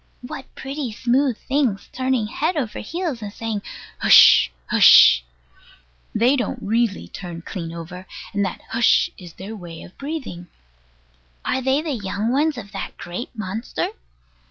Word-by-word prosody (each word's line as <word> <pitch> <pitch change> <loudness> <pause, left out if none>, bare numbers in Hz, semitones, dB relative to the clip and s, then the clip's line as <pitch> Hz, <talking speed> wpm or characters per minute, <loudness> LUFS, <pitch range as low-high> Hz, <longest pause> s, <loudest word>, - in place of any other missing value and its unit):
What 260 +1 -7
pretty 270 -2 -5
smooth 250 +2 +1
things, 265 -8 -1
turning 255 -3 0
head 310 +10 -1
over 245 -7 -3
heels, 325 - -4
and 205 -1 -6
saying, 225 -1 -4 0.4
"Hush, - - +7
Hush!" - - +7 0.9
They 245 +5 +4
don't 245 -6 -2
really 225 -1 0
turn 170 -3 -8
clean 170 -3 -6
over; 175 +3 -9 0.3
and 200 0 +1
that 190 - -4
"Hush" 230 -1 +3
is 175 -3 -11
their 200 +4 -8
way 170 -5 -9
of 180 - -14
breathing. 275 - -6 1.0
Are 260 - 0
they 265 +3 +1
the 320 - -3
young 210 0 -2
ones 295 +2 +1
of 200 -4 -8
that - - -6
great 180 +8 -6
monster? 215 +3 -3
225 Hz, 145 wpm, -22 LUFS, 190-265 Hz, 1.0 s, Hush